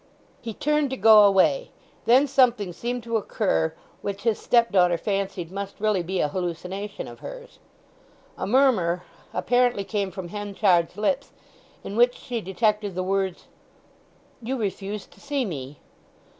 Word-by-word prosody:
He 225 -3 -6
turned 300 -1 +1
to 265 - -4
go 215 0 +8
away. 200 - +3 0.4
Then 255 +4 +6
something 245 -9 +2
seemed 240 +5 -4
to 230 0 0
occur 80 - 0 0.3
which 200 0 -5
his 225 -2 +1
stepdaughter 190 -8 +3
fancied 195 -2 -3
must 200 0 -6
really 210 -3 +1
be 185 +2 -3
a - - +2
hallucination 185 +4 -4
of - - -11
hers. - - -10 0.8
A - - -4
murmur 200 -9 +3 0.3
apparently 245 +3 +1
came 200 -1 -2
from 185 -1 -7
Henchard's 200 -3 +1
lips 270 +6 -1 0.5
in 200 - -6
which 245 +2 +4
she 240 -3 -5
detected 210 0 0
the 185 - -1
words, 190 -1 -1 1.0
"You 255 +4 -3
refused 205 -1 -4
to - - -19
see 285 -2 -1
me!" 140 - -6
205 Hz, 145 wpm, -25 LUFS, 185-240 Hz, 1.0 s, go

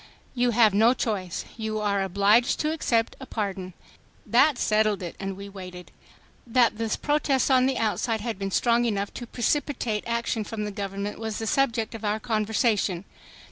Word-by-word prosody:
"You 245 -1 +2
have 225 -3 +4
no 225 +5 +5
choice. 195 -8 -3
You 220 -1 -3
are 200 -2 0
obliged 200 +5 +3
to 305 - 0
accept 230 -8 0
a 265 - -9
pardon." 190 -4 -4 0.5
That 300 -4 +4
settled 215 -3 +1
it, 170 - -6
and 195 -1 -4
we 200 0 -8
waited. 180 -2 -10 0.6
That 235 -2 +3
the 225 -1 -1
protest 290 -3 +1
on 255 0 +5
the 265 - 0
outside 225 +1 0
had 225 -3 -4
been 195 0 -2
strong 235 +4 +2
enough 200 -3 -1
to 240 - -7
precipitate 245 -3 -1
action 235 -1 -1
from 210 +1 -5
the 210 - -4
government 200 0 -4
was 220 -1 -4
the 225 - -3
subject 235 -2 +1
of 225 -1 -8
our 210 +1 0
conversation. 215 -4 0
220 Hz, 175 wpm, -26 LUFS, 200-240 Hz, 0.6 s, no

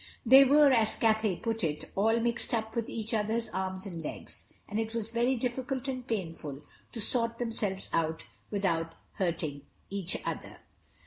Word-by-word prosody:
They 265 +4 +9
were, 290 +1 +6
as 225 -4 +3
Cathay 220 -3 +2
put 225 +3 -2
it, 150 -2 -2
"all 225 +4 +3
mixed 235 +1 0
up 220 -1 -3
with 230 -2 -1
each 225 0 -3
other's 220 +1 0
arms 190 -1 -3
and 170 -4 -6
legs," - - -7 0.2
and 210 +1 -2
it 225 0 -3
was 225 -1 -2
very 240 +3 +2
difficult 255 +2 -2
and 255 -2 -4
painful 165 - -4 0.3
to 230 - -5
sort 230 +1 0
themselves 215 -5 -2
out 160 -1 0 0.2
without 170 -5 0 0.2
hurting 160 -6 -1 0.3
each 195 -2 -1
other. - - -4
220 Hz, 165 wpm, -30 LUFS, 185-235 Hz, 0.3 s, They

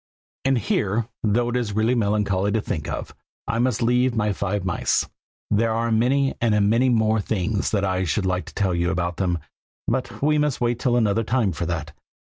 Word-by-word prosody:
And 135 -1 +3
here, 110 0 0
though 115 +3 +1
it 120 - -2
is 120 -4 -1
really 110 +4 +2
melancholy 105 -3 +1
to 110 - +1
think 75 - -4
of, - - -5 0.3
I 115 - -1
must 120 -2 +1
leave 125 +1 +2
my 105 -2 +1
five 100 0 -2
mice. 95 - 0 0.4
There 110 +2 +2
are 115 +1 0
many 130 +5 +2
and 105 -3 +3
many 125 +3 +3
more 110 -2 +2
things 100 0 -1
that 100 -2 0
I 95 -1 0
should 95 +4 0
like 90 0 -1
to - - -12
tell 95 -3 +1
you 85 0 0
about 90 -2 -2
them, 90 -3 0 0.5
but 125 +2 -2
we 150 +1 +2
must 150 -3 0
wait 120 0 0
till 120 -2 +2
another 110 -1 +2
time 115 -3 +1
for 85 +1 -3
all 85 +1 -1
that. 75 -1 -7
110 Hz, 205 wpm, -23 LUFS, 95-120 Hz, 0.5 s, And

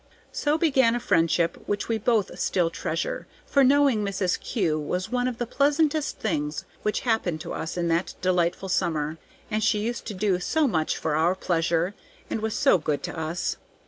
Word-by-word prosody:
So 295 +1 +1
began 265 -8 +3
a - - 0
friendship 170 -6 +1
which 205 0 -1
we 225 -1 0
both 220 -2 0
still 175 -3 +1
treasure, - - -3 0.2
for 280 - +3
knowing 270 -4 +4
Mrs. 190 -2 0
Kew 170 -10 0
was 180 +7 -3
one 250 0 +1
of 250 -2 -3
the 240 - -2
pleasantest 295 +4 +1
things 150 -7 -2 0.2
which 210 - -1
happened 220 -9 0
to - - -6
us 160 - -4
in 170 -1 0
that 170 +2 0
delightful 180 0 +1
summer, 160 -4 -1 0.3
and 215 0 0
she 215 0 +3
used 235 +3 -3
to 210 - -4
do 190 -1 +1
so 305 - +1
much 160 -9 0
for 155 -2 -1
our 165 +4 +3
pleasure, 170 0 0 0.4
and 220 - -1
was 220 0 -2
so 185 - +4
good 150 -2 -2
to - - -4
us. 160 +1 -2
195 Hz, 185 wpm, -26 LUFS, 170-240 Hz, 0.4 s, knowing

